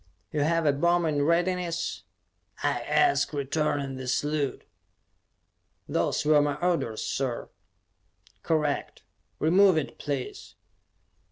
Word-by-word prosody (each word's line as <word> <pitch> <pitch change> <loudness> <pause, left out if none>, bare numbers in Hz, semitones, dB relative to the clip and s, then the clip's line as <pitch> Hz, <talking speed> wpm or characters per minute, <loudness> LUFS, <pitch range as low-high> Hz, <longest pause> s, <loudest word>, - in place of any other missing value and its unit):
"You 150 - -2
have 165 +2 +1
a 145 - +4
bomb 170 +4 +2
in 150 -2 +1
readiness?" 170 +1 0 0.6
I - - +1
asked, 360 - +2
returning 140 -1 -1
the 130 -1 -6
salute. 145 +2 -1 1.2
"Those - - 0
were 150 -1 +5
my 145 -1 0
orders, 155 -9 -1
sir." 130 -3 -2 0.9
"Correct. 150 -3 -1 0.4
Remove 185 +3 +5
it, 135 -6 -3
please." 140 -3 -5
150 Hz, 105 wpm, -27 LUFS, 140-170 Hz, 1.2 s, were